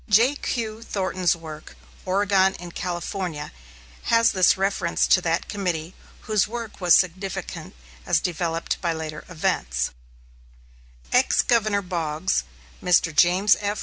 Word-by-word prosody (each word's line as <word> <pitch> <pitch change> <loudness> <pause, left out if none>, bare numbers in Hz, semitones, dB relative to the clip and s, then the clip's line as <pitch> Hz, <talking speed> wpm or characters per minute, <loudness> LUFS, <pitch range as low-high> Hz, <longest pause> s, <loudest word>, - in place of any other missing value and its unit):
J.Q. 230 -1 +1
Thornton's 185 -5 0
work, 155 -2 -10 0.3
"Oregon 190 0 +2
and 175 -1 -9
California," 175 -3 -4 0.5
has 230 0 +4
this 185 -1 +4
reference 190 -3 +1
to 185 - +4
that 170 0 -1
committee, 180 -4 -3 0.3
whose 215 -3 +1
work 230 -2 -7
was 175 -2 +6
significant 185 - -2 0.3
as - - +2
developed 170 -1 -2
by 170 -2 0
later 155 -1 -6
events: 65 - -1 1.2
Ex - - +4
Governor 215 -4 +2
Boggs, 170 -1 -1 0.4
Mr. 170 -3 +2
James 185 +6 +5
F. 205 0 -2
185 Hz, 115 wpm, -24 LUFS, 165-200 Hz, 1.2 s, was